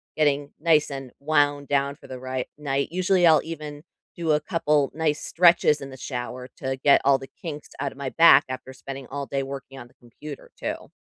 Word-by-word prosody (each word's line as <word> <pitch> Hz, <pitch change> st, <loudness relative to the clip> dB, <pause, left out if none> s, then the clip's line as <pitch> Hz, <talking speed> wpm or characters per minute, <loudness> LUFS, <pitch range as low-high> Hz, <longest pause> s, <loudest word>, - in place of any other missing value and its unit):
getting 145 Hz, -2 st, +1 dB
nice 155 Hz, -2 st, +3 dB
and 135 Hz, -2 st, -7 dB
wound 145 Hz, -1 st, +1 dB
down 140 Hz, 0 st, +1 dB
for -, -, -16 dB
the 130 Hz, -, -7 dB
right 130 Hz, 0 st, -4 dB
night. 140 Hz, -2 st, -1 dB
Usually, 185 Hz, 0 st, +2 dB
I'll 160 Hz, -, +6 dB
even 150 Hz, -2 st, -7 dB, 0.3 s
do 165 Hz, -2 st, -1 dB
a 150 Hz, -, +4 dB
couple 150 Hz, -3 st, +1 dB
nice 155 Hz, -2 st, 0 dB
stretches 170 Hz, -3 st, +4 dB
in 135 Hz, -, -7 dB
the 130 Hz, -, -10 dB
shower 125 Hz, 0 st, -5 dB
to 130 Hz, 0 st, -3 dB
get 140 Hz, -, +6 dB
all 140 Hz, -1 st, +5 dB
the 135 Hz, -, -9 dB
kinks 150 Hz, -4 st, -7 dB
outta 140 Hz, -1 st, -2 dB
my 140 Hz, -1 st, -4 dB
back 165 Hz, +4 st, +7 dB
after 130 Hz, 0 st, -6 dB
spending 135 Hz, 0 st, -8 dB
all 140 Hz, 0 st, -4 dB
day 135 Hz, -1 st, -2 dB
working 135 Hz, 0 st, -8 dB
on 120 Hz, -, -10 dB
the -, -, -26 dB
computer 135 Hz, +4 st, -11 dB
too. -, -, -5 dB
140 Hz, 200 wpm, -25 LUFS, 135-155 Hz, 0.3 s, back